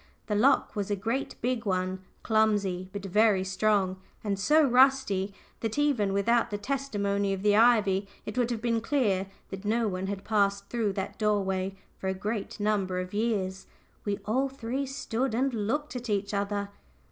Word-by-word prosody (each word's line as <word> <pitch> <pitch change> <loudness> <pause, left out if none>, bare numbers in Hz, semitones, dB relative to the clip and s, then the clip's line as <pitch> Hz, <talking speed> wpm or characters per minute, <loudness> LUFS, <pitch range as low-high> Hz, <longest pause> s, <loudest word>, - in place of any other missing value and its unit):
The 210 - -2
lock 245 +7 +3
was 205 -1 -2
a 205 - +1
great 225 +7 -2
big 245 -1 0
one, 185 -2 -1 0.2
clumsy, 205 -5 +1
but 200 0 -6
very 205 0 +3
strong, 190 0 +1 0.3
and 200 -2 -1
so 305 +10 +5
rusty 250 -6 +3 0.3
that, 225 +1 -3
even 275 -9 +2
without 230 +4 +2
the 205 - -2
testimony 205 -5 -1
of 195 0 -4
the 205 -1 +4
ivy, 210 -4 +4 0.2
it 215 - -5
would 245 -2 +1
have 230 -2 -3
been 230 -1 +1
clear 215 -7 +1 0.2
that 195 0 -7
no 225 +2 +1
one 185 -1 -3
had 200 0 -4
passed 200 -2 +1
through 225 -4 0
that 190 0 -4
doorway 195 -3 0 0.2
for 190 - -4
a 190 - 0
great 205 +2 -4
number 200 -3 0
of 185 +1 -5
years. 205 -4 -1 0.4
We 205 -1 -1
all 260 +6 +1
three 265 +1 -3
stood 260 -2 -2
and 265 +2 +1
looked 255 +8 -2
at 245 -1 -5
each 200 0 -1
other. 200 0 -1
210 Hz, 175 wpm, -28 LUFS, 195-235 Hz, 0.4 s, so